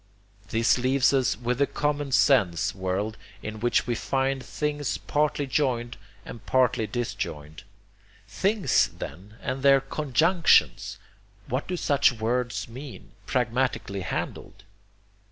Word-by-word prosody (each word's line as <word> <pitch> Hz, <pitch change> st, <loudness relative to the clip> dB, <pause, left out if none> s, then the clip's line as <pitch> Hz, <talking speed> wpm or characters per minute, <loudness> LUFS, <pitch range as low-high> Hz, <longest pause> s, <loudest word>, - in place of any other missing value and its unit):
This 115 Hz, +2 st, +2 dB
leaves 130 Hz, +2 st, +3 dB
us 130 Hz, -5 st, +2 dB
with 125 Hz, +1 st, -2 dB
the 140 Hz, -, +3 dB
common 145 Hz, -1 st, -2 dB
sense 115 Hz, -, +3 dB
world, 95 Hz, +3 st, -2 dB, 0.3 s
in 110 Hz, 0 st, -6 dB
which 120 Hz, +2 st, +1 dB
we 120 Hz, -, -1 dB
find 135 Hz, +2 st, -1 dB
things 150 Hz, -2 st, -2 dB
partly 150 Hz, -1 st, 0 dB
joined 125 Hz, -3 st, -1 dB, 0.3 s
and 115 Hz, -, -9 dB
partly 125 Hz, -2 st, +2 dB
disjoined. 80 Hz, -9 st, -5 dB, 0.7 s
'Things,' 200 Hz, 0 st, +2 dB
then, 100 Hz, +5 st, -8 dB
and 130 Hz, +1 st, -3 dB
their 135 Hz, 0 st, +6 dB
'conjunctions' 155 Hz, +5 st, +2 dB, 0.5 s
what 130 Hz, +4 st, -3 dB
do 180 Hz, -, -2 dB
such 140 Hz, -5 st, +3 dB
words 120 Hz, +2 st, -2 dB
mean, 130 Hz, +3 st, -10 dB, 0.2 s
pragmatically 125 Hz, -5 st, -1 dB
handled? 95 Hz, -, -5 dB
125 Hz, 120 wpm, -26 LUFS, 115-140 Hz, 0.7 s, their